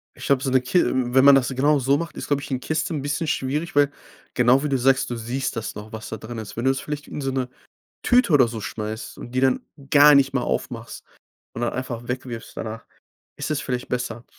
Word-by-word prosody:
Ich 135 0 -7
habe 140 0 +3
so 135 - 0
'ne 130 - +5
Ki 130 +8 +2 0.3
wenn 130 0 +6
man 140 -1 +9
das 135 -1 +2
genau 140 +3 +2
so 135 +2 +2
macht, 170 0 -6
ist, - - -5
glaube 145 -1 +1
ich - - -9
'ne 130 - 0
Kiste 155 +4 -2
'n 145 - -2
bisschen 145 +3 -2
schwierig, 150 +4 -2
weil 145 -1 +4 0.4
genau 125 +2 +4
wie 150 - -1
du 135 - +2
sagst, 130 +1 +2
du 120 - -3
siehst 120 +3 -3
das 115 - -4
noch, 105 +1 -9
was 110 0 -7
da 110 - -5
drin 115 +3 -8
ist. 110 -1 -8
Wenn 115 - -2
du 135 - +5
es 135 - -3
vielleicht 150 0 -6
in - - -6
so 135 -1 -1
'ne 130 -1 -2 0.5
Tüte 245 -6 +4
oder 130 -5 +6
so 115 -2 -6
schmeißt 110 +1 -5
und 120 - -9
die 130 - +1
dann 130 -1 +2 0.2
gar 145 +1 +8
nicht 140 0 +4
mehr 135 - 0
aufmachst - - -4 0.5
und 120 - -6
dann 120 - 0
einfach 120 -2 -5
weg 125 +1 -3
wirfst 115 -3 -8
danach, 110 +1 -6 0.5
ist - - -4
das 150 -1 0
vielleicht 125 -2 -3
besser. 120 -1 -3
130 Hz, 250 wpm, -23 LUFS, 120-145 Hz, 0.5 s, man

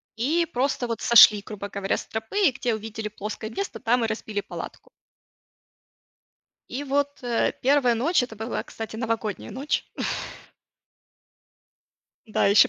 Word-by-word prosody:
И 305 +10 +1
просто 250 -1 0
вот 230 -2 -3
сошли, 215 -3 +8
грубо 200 -1 -6
говоря, 200 -1 -1
с - - -6
тропы, 265 - +1
и - - +3
где 245 -2 -1
увидели 220 0 -5
плоское 215 +1 -6
место, 395 - -4
там 245 0 +2
и - - +2
разбили 215 -1 -3
палатку. - - -8 1.8
И 285 +3 -4
вот, 285 0 -1
э, 240 -1 +1
1 265 -2 +4
ночь, 265 +6 +2
это 225 -3 -6
была, 225 +2 -3
кстати, 220 0 -7
Новогодняя 225 -3 -2
ночь. 265 +7 -2 2.4
Да, 215 - +1
ещё 205 +5 +7
230 Hz, 135 wpm, -25 LUFS, 215-265 Hz, 2.4 s, сошли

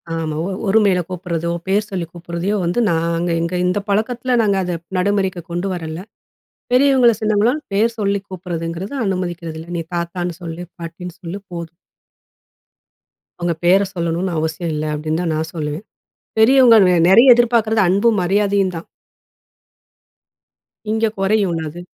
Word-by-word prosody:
ஆமா. 160 -2 -3
ஒ - - -3 0.2
ஒருமையில 195 -3 +3
கூப்ட்றதோ, 170 -2 -3 0.2
பேர் 205 +2 +1
சொல்லி 185 -3 -3
கூப்பிட்றதையோ 175 +3 -3
வந்து 175 +7 0
நாங்க 170 +1 0
எங்க 170 +2 -2
இந்த 180 +3 +1
பழக்கத்ல 240 +5 0
நாங்க 200 -3 +2
அத 175 -1 -2 0.2
நடைமுறைக்கு 190 -1 0
கொண்டு 175 +3 -2
வரல. 160 -3 -5 0.8
பெரியவங்கள, 260 -2 +5
சின்னவங்கலாம் 220 +6 +1
பேர் 225 +3 +2
சொல்லி 200 -1 +1
கூப்ட்றதுங்கிறது, 175 +2 -5
அனுமதிக்கிறது 175 -4 -3
இல்ல. 165 - -10
நீ - - -1
தாத்தான்னு 175 +1 -3
சொல்லு, 170 0 -6
பாட்டின்னு 170 +1 -8
சொல்லு 175 +2 -6
போதும். 170 -1 -7 1.6
அவுங்க 175 -1 -1
பேர 185 +3 +5
சொல்லணுன்னு 170 +1 -2
அவசியம் 160 +1 -2
இல்ல, 150 +1 -2
அப்டீன்னு 155 +2 -2
தான் 165 -3 -1
நான் 160 +1 -3
சொல்லுவேன். 155 +3 -4 0.6
பெரியவுங்கள் 230 -3 +7
வே 180 - +4
நெறைய 235 +7 +8
எதிர்பாக்குறது 225 -2 +2
அன்பும், 205 +4 +3
மரியாதையும் 195 0 +1
தான். 165 - -8 2.0
இங்க 220 +1 +1
குறையுன்ல்ல 195 -5 +1
அது! 175 +4 -9
180 Hz, 135 wpm, -19 LUFS, 170-205 Hz, 2.0 s, நெறைய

